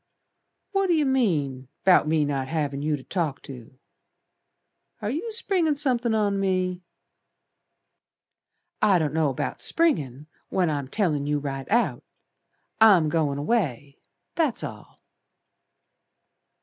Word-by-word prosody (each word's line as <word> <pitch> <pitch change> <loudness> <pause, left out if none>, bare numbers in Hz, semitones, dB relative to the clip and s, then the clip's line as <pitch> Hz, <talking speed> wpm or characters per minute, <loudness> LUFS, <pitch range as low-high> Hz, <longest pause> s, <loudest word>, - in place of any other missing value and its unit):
"What 390 -1 +1
do 345 - +3
yer 305 -2 +2
mean 155 - 0 0.2
'Bout 180 -5 +5
me 155 -1 +2
not 135 -2 -2
havin' 145 -2 -2
you 150 +1 0
to 135 - -13
talk 165 -7 -2
to? 125 -1 -11 1.2
Are 215 -1 -3
yer 340 - -3
springin' 380 -8 +1
somethin' 250 -5 0
on 205 -2 +1
me?" 185 -2 -1 2.0
"I 200 -3 +5
don't 155 -3 -1
know 155 -3 +1
'bout 130 - -4
springin' 150 - +1 0.2
When 180 -4 +1
I'm 140 -3 -3
tellin' 150 -4 -1
you 150 0 +1
right 135 -2 -5
out. 235 +3 +1 0.8
I'm 195 -8 +6
goin' 150 -3 0
away, 145 - -2 0.3
that's 310 -8 0
all." - - -9
170 Hz, 125 wpm, -25 LUFS, 145-235 Hz, 2.0 s, I'm